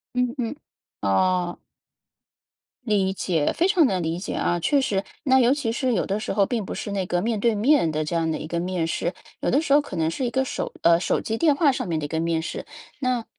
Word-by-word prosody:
嗯 250 -1 +1
嗯， 245 +2 -2 0.5
哦。 175 - +1 1.3
理 195 -4 +1
解， 170 -5 0
非 340 - +1
常 375 -5 +4
能 185 -5 -1
理 165 +2 -2
解 195 - -5
啊。 175 0 0
确 280 - +2
实， 200 -6 0 0.2
那 265 -3 +4
尤 250 +1 +5
其 270 -6 -2
是 250 +1 0
有 190 - 0
的 200 +2 -1
时 215 - -3
候 200 0 +3
并 225 -2 -2
不 - - -5
是 205 - -5
那 195 -2 -1
个 175 0 0
面 220 +1 -1
对 230 +1 +2
面 240 - +3
的 155 0 -1
这 155 - -4
样 165 -1 +1
的 155 - -1
一 - - -6
个 170 +2 -2
面 180 -1 -1
试， 165 +2 -2 0.3
有 - - -1
的 280 - +3
时 320 - -4
候 290 - +7
可 - - -8
能 160 -1 0
是 255 - -2
一 - - 0
个 265 +2 +1
手 - - -4
呃， 170 0 +5
手 - - 0
机 225 0 -2
电 305 0 +3
话 290 -1 +4
上 255 - -3
面 165 - -1
的 150 - -3
一 - - -3
个 160 - -1
面 165 0 0
试， 160 - -5 0.4
那 245 -2 0
200 Hz, 270 characters per minute, -24 LUFS, 170-250 Hz, 1.3 s, 候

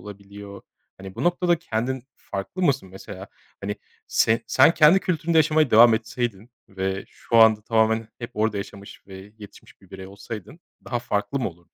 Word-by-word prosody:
olabiliyor. 100 -1 -11 0.4
Hani, 95 0 -10
bu - - -4
noktada 175 -1 +1
kendin 125 -2 -3
farklı 100 - -6
mısın? 135 - +1
Mesela, 95 +1 -10 0.3
hani, 105 +1 -4 0.3
se 110 +1 +2
sen 140 +6 +4
kendi 160 +5 +6
kültüründe 165 -2 0
yaşamaya 155 -2 +3
devam 115 +1 +7
etseydin 115 -1 -4 0.2
ve 95 0 -4
şu 115 - -3
anda 110 -2 +6
tamamen 110 0 +1
hep 120 - -7
orada 110 -1 0
yaşamış 100 0 -9
ve 95 +1 -12
yetişmiş 105 -1 -15
bir 95 - -22
birey 95 -1 -9
olsaydın 105 - -10 0.2
daha 120 - -2
farklı 105 +1 -2
mı 125 - -1
olurdun? 85 0 -18
110 Hz, 165 wpm, -23 LUFS, 100-130 Hz, 0.4 s, devam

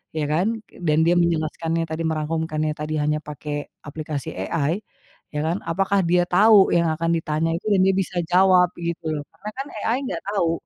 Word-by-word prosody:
ya 155 - -1
kan, 210 +8 +1
k - - -18
dan 155 -1 +3
dia 175 - +4
menjelaskannya 165 0 0
tadi 160 +1 -4
merangkumkannya 155 0 -1
tadi 150 +1 -4
hanya 150 +1 +1
pakai 145 0 -5 0.2
aplikasi 150 -2 -5
AI 150 - -1 0.6
ya 150 - 0
kan, 170 +4 -1
apakah 195 +4 +1
dia 175 +1 +4
tahu 200 +3 +5
yang 170 -1 +3
akan 165 +1 -1
ditanya 160 +1 -1
itu 200 - -11
dan 200 -3 +3
dia 190 - +4
bisa 190 -1 -2 0.2
jawab 180 -1 +5
gitu 170 -1 -3
loh? 150 -2 -3
Karena 205 +6 -8
kan 275 +1 -4 0.2
AI 230 +3 +1
enggak 170 - -4
tahu 185 -5 +1
165 Hz, 185 wpm, -23 LUFS, 155-185 Hz, 0.6 s, tahu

